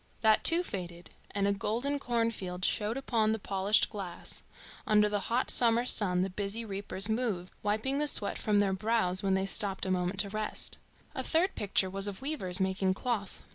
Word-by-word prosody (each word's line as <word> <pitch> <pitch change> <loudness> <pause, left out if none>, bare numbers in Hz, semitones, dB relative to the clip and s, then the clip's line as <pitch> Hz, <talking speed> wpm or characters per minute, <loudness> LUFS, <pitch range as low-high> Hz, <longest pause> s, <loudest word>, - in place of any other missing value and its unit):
That, 220 -1 +4
too, 340 +1 +6
faded, 175 - -7 0.2
and 200 0 -1
a 200 - +2
golden 240 +8 -1
cornfield 230 -8 -2
showed 215 +3 -1
upon 225 -5 +1
the - - -1
polished 200 0 +2
glass; 195 -5 -4 0.5
under 210 -1 +4
the 205 0 -1
hot 245 +3 +1
summer 235 0 +4
sun 185 -7 +3
the 190 - -2
busy 205 +4 -2
reapers 200 -1 -2
moved, 220 -6 -2
wiping 220 +7 0
the 300 - +1
sweat 205 -7 +1
from 210 -1 +1
their 200 -1 +2
brows 190 -2 +1
when 195 -1 +1
they 190 0 0
stopped 195 -1 +1
a 190 - -1
moment 180 +1 -1
to 200 - -5
rest. 215 +1 -3 0.3
A - - -2
third 345 +4 +1
picture 200 -2 +1
was 195 +2 0
of 200 -2 -6
weavers 235 -11 -1
making 190 0 0
cloth. 215 -3 -4
205 Hz, 185 wpm, -30 LUFS, 190-230 Hz, 0.5 s, too